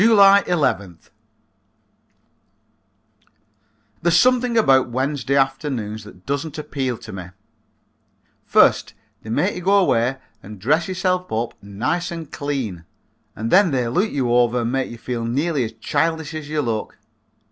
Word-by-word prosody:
July 200 -3 +7
11th. 100 - -1 2.9
There's 170 0 +3
something 250 -2 +3
about 135 - +4
Wednesday 130 +1 -1
afternoons 135 -6 -1
that 95 -3 -15
doesn't 145 +3 -3
appeal 135 -5 -3
to - - -11
me. 95 -2 -6 1.2
First - - +3 0.3
they 110 - -10
make 180 - 0
you 180 - -5
go 195 +3 +3
away 135 -9 +2 0.2
and 105 +1 -10
dress 150 - +1
yourself 185 -1 -1
up 115 +2 -2
nice 125 - -2
and 165 -4 -7
clean 130 - -4 0.5
and 110 +1 -4
then 195 -1 +6
they 125 -5 0
look 185 - +1
you 125 -4 -1
over 120 0 +3
and 115 0 -2
make 135 0 -1
you 120 - -9
feel 120 0 -4
nearly 140 +5 0
as 110 - -7
childish 160 +7 -1
as 155 -2 -6
you 150 -1 -1
look. 115 -3 -3
135 Hz, 140 wpm, -21 LUFS, 115-170 Hz, 2.9 s, July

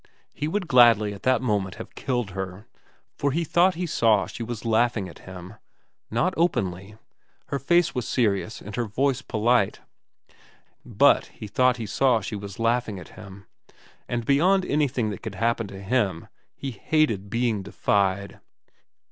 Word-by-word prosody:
He 150 - -3
would 185 +2 -2
gladly 115 -5 +5
at 100 - -11
that 130 0 +2
moment 100 -5 -1
have - - -10
killed 120 -6 -2
her, 95 +2 -6 0.5
for 140 - -1
he 165 +5 0
thought 175 +4 +3
he 180 +2 -2
saw 115 - +3
she - - -9
was 115 0 -5
laughing 115 -3 +1
at 85 - -12
him. 90 +1 -9 0.6
Not 170 +12 +1
openly. 100 - -1 0.5
Her 140 -1 -2
face 175 +5 +2
was 125 -4 -3
serious 110 -2 0
and 105 - -8
her 120 - 0
voice 130 +5 0
polite; 110 -3 +1 1.0
but - - +3
he - - -10
thought 125 +4 +2
he 115 - -4
saw 125 +3 +2
she 105 +1 -5
was 100 -1 -7
laughing 115 -2 0
at 90 - -10
him, 100 -1 -12 0.6
and 120 -1 -2
beyond 180 +8 +3
anything 130 -7 0
that 100 - -7
could 110 -4 -6
happen 115 +2 0
to 95 -1 -9
him 100 -6 -1 0.3
he 135 - -5
hated 115 -5 0
being 115 -2 0
defied. 100 0 -1
115 Hz, 160 wpm, -25 LUFS, 100-130 Hz, 1.0 s, gladly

